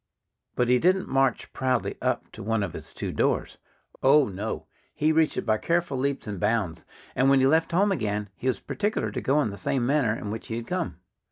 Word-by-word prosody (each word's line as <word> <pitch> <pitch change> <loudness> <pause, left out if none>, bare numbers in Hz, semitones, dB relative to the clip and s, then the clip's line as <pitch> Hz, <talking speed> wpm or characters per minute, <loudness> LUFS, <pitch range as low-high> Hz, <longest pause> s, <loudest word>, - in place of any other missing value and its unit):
But 125 - +2
he 125 0 +4
didn't 185 +4 +2
march 135 -2 +1
proudly 130 -2 0
up - - -1
to - - -10
one 110 0 0
of 90 - -4
his - - -8
two - - -4
doors. - - 0 0.4
Oh, 140 +1 +5
no! 100 +3 -4 0.3
He 155 +1 +2
reached 160 0 +2
it - - -2
by 110 -2 +2
careful 170 -4 0
leaps 140 +1 -1
and 105 -4 -5
bounds. 105 -7 0 0.3
And 130 +1 +3
when 135 -1 +5
he 130 - +4
left 160 +4 +3
home 195 +4 +3
again 105 - -1
he 130 - -5
was 130 - +1
particular 210 +1 -2
to - - -4
go 140 +3 +2
in 110 - -2
the 100 - -8
same 120 +5 0
manner 130 -5 +2
in 105 - -5
which 110 - -6
he 110 - -3
had 115 0 -4
come. - - -3
130 Hz, 225 wpm, -26 LUFS, 110-150 Hz, 0.4 s, Oh